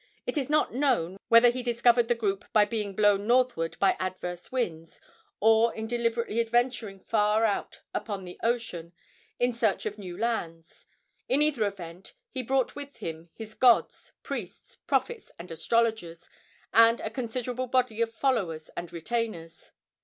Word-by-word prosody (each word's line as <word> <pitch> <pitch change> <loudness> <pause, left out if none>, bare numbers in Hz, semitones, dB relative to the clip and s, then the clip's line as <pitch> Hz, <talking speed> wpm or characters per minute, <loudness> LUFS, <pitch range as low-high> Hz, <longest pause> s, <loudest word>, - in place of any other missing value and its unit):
It - - -3
is 280 -3 -1
not 300 -4 +2
known 240 - +1
whether 230 +1 +7
he 255 +1 -4
discovered 240 0 +3
the 240 - +2
group 200 -4 -2
by 210 -1 +6
being 210 -3 -3
blown 205 0 +3
northward 240 -9 +2
by 195 - +4
adverse 180 -1 -5
winds, 165 -11 -3 0.4
or 225 +2 +4
in 220 - -4
deliberately 235 -1 -1
adventuring 235 -3 0
far 215 +2 +2
out 205 -2 -2
upon 200 -3 -4
the 180 -1 -10
ocean 225 -8 -2 0.4
in 245 0 +1
search 225 -4 0
of 210 +1 -4
new 180 -3 -7
lands. 170 -8 -4 0.4
In 285 +3 +4
either 275 -9 +2
event, 180 -2 -9 0.2
he 260 - -3
brought 260 +1 0
with 285 -1 -9
him 165 +1 -7
his 220 -1 -8
gods, 245 -1 +3
priests, 480 -1 -7
prophets 475 -1 -1
and 170 +1 -9
astrologers, 220 -2 -1 0.4
and 230 +2 +6
a 220 - -4
considerable 250 +1 -3
body 250 -3 +1
of 230 -1 +1
followers 215 - -1
and 170 0 -6
retainers. 170 -2 -4
225 Hz, 155 wpm, -28 LUFS, 190-240 Hz, 0.4 s, whether